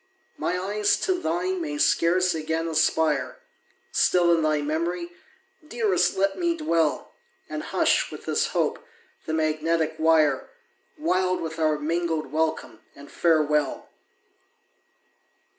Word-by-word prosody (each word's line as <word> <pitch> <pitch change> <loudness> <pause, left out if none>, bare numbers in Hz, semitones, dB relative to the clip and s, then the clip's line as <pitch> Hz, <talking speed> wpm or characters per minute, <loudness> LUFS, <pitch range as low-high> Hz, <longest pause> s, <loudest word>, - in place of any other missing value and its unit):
My 180 - -2
eyes 205 +2 +1
to 370 -1 0
thine 360 +2 -1
may 300 -2 -4
scarce 180 - +2
again 160 +1 -2
aspire 160 - +1 0.5
Still 175 -1 +3
in 165 - 0
thy 155 -1 +1
memory, 170 +3 -2 0.6
dearest 220 - +1
let 195 - 0
me 340 -1 0
dwell, 165 - 0 0.3
And - - -5
hush, - - +1
with - - -10
this - - +1
hope, - - -1 0.4
the 160 - -2
magnetic 160 +1 0
wire, 155 -4 +3 0.5
Wild 185 - 0
with 160 0 -5
our 155 -1 +2
mingled 160 -1 -2
welcome 155 -7 -2 0.2
and 140 0 -13
farewell! 150 -4 +1
165 Hz, 120 wpm, -25 LUFS, 155-185 Hz, 0.6 s, Still